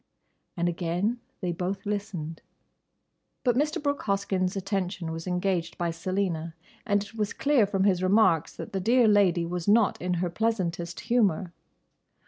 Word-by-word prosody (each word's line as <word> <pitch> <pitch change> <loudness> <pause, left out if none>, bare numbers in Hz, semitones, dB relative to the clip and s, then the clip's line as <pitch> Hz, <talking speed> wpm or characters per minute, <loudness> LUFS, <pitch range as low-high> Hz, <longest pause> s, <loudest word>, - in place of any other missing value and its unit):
"—And 170 0 +1
again 175 +7 -1 0.2
they 180 -2 -1
both 185 +4 -3
listened. 200 -6 -4 1.0
But 245 -3 +3
Mr. 300 +3 +1
Brooke 285 -1 -1
Hoskyn's 195 -2 0
attention 190 -3 -2
was 165 +2 -6
engaged 180 -2 -1
by 170 -1 -1
Selina, 170 -2 -2 0.3
and 205 -1 +2
it 210 - -13
was 210 -2 -2
clear 275 -8 +3
from 195 -1 0
his 190 -3 +3
remarks 185 -4 +3
that - - -8
the 195 - 0
dear 235 +4 +4
lady 195 -5 +4
was 175 0 -4
not 210 0 +4
in 180 0 0
her 175 +1 -1
pleasantest 175 -5 -1
humour. 200 -7 +1
190 Hz, 150 wpm, -27 LUFS, 175-210 Hz, 1.0 s, dear